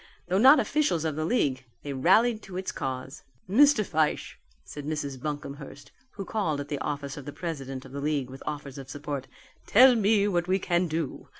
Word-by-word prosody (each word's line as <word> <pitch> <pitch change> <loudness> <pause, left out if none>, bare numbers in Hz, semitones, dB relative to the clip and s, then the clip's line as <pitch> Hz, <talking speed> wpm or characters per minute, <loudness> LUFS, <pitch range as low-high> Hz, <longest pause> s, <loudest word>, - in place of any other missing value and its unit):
Though 185 +2 +2
not 265 +6 +8
officials 250 - +1
of 155 -2 -1
the 155 +1 -2
league 140 - 0 0.2
they 145 - -4
rallied 215 - +3
to 185 -3 -8
its 185 - -3
cause. 130 +1 -5 0.3
"Mr. 240 +2 +5
Fyshe," 155 -3 -1 0.2
said 145 - -8
Mrs. 145 -4 -3
Buncomhearst, 145 -1 -7 0.2
who 195 - -6
called 175 -8 -1
at 145 0 -6
the 145 - -3
office 140 -1 -4
of 145 - -8
the 145 - -6
president 135 -6 -6
of 130 - -12
the 140 +1 -5
league 145 -3 -1
with 135 - -10
offers 145 -2 -5
of 135 -1 -10
support, 140 -1 -5 0.4
"tell 255 +4 +7
me 210 -2 +3
what 175 -3 0
we 190 +1 +2
can 175 -1 0
do. 160 -3 -4
155 Hz, 195 wpm, -27 LUFS, 140-195 Hz, 0.4 s, not